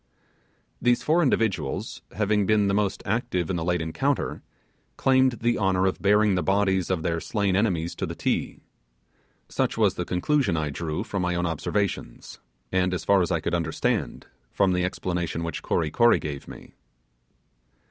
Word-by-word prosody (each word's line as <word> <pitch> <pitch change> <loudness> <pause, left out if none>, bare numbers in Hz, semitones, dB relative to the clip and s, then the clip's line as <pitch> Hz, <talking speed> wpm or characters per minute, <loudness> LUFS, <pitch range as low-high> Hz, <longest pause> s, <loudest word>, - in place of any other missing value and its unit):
These 120 0 +2
four 165 +3 +3
individuals, 105 - -1
having 105 -1 +1
been 105 -2 +3
the 100 - +1
most 100 -1 0
active 100 -6 -1
in - - -1
the 85 - -2
late 90 -1 0
encounter, 135 - -1 0.6
claimed 130 -1 +3
the 120 0 +1
honour 95 -2 +2
of 95 - -1
bearing 105 +1 +4
the 90 - +1
bodies 95 -1 +1
of 90 -4 -1
their 85 0 0
slain 100 0 0
enemies 90 -5 0
to - - -2
the - - -6
Ti. - - -2 0.9
Such - - -1
was - - +3
the - - -3
conclusion 100 - +1
I 75 -2 -1
drew 75 +1 -3
from 100 - -3
my 90 0 0
own 85 0 0
observations, 85 -3 -3 0.3
and, 90 0 +1
as 85 - -5
far 100 -1 +4
as 85 - 0
I 85 -4 0
could 80 - -2
understand, 85 -2 -1 0.3
from 95 -2 +2
the 90 0 +1
explanation 85 -3 -2
which 85 -2 -4
Kory 80 -3 -1
Kory 120 +5 +5
gave 70 -2 -6
me. - - -12
95 Hz, 170 wpm, -25 LUFS, 85-105 Hz, 0.9 s, Kory